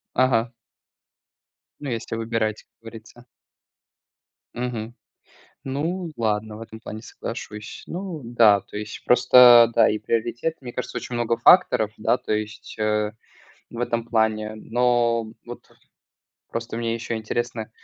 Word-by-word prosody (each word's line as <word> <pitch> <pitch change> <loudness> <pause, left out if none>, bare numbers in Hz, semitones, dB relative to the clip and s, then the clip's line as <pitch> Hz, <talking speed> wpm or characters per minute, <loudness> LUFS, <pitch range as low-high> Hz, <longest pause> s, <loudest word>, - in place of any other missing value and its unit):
Ага. 120 -2 +2 1.3
Ну, 145 - -5
если 115 -1 -4
выбирать, 115 -1 -2
как - - -47
говорится. 115 +1 -13 1.3
Мгм. 120 -2 -4 0.7
Ну 165 +6 -3
ладно, 110 -1 -1
в - - -11
этом 110 0 -10
плане 110 -1 -8
соглашусь. 110 -2 -8
Ну 175 -3 -5
да, 115 -4 +5
то - - -10
есть 105 0 -7
просто, 125 -1 +7
да, 115 -1 +5
и 105 - 0
приоритет, 120 +8 -2
мне 120 -2 -8
кажется, 125 0 -4
очень 125 - -5
много 120 -1 0
факторов, 115 - +5
да, 115 - +1
то 125 -3 -3
есть 110 0 -5
в 105 0 -2 0.5
этом 115 -1 -1
плане. 110 -2 0
Но 115 0 +1
вот 120 0 -11 0.8
просто 115 0 -4
мне 115 0 -1
еще 115 0 -4
интересно. 110 0 -3
115 Hz, 130 wpm, -23 LUFS, 110-120 Hz, 1.3 s, просто